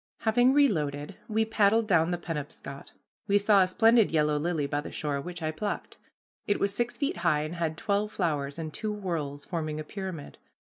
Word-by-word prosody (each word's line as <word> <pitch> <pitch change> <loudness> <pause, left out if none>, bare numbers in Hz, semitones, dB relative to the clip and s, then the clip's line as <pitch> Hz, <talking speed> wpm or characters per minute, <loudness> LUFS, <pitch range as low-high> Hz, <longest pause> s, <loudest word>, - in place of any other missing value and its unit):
Having 245 +3 +4
reloaded, 150 - +1
we 220 0 +1
paddled 220 0 +3
down 165 -4 +3
the 175 - 0
Penobscot. 145 -4 -7 0.4
We 200 0 +4
saw 205 -1 +5
a 185 - +4
splendid 225 +3 +4
yellow 150 -2 +2
lily 160 -2 0
by 145 +1 -1
the - - -8
shore, 145 -2 -2
which 175 +1 -7
I 155 - 0
plucked. 200 +6 -4 0.5
It 205 - +1
was 200 0 +1
six 240 +3 -1
feet 280 -9 -1
high 165 -3 +2
and 155 +2 -5
had 160 -2 -1
twelve 205 +3 0
flowers, 145 -7 -1
in 160 -2 -5
two 215 +8 -3
whorls, 155 -8 -4
forming 155 -3 -3
a - - -4
pyramid. 185 -3 -7
170 Hz, 190 wpm, -28 LUFS, 150-205 Hz, 0.5 s, saw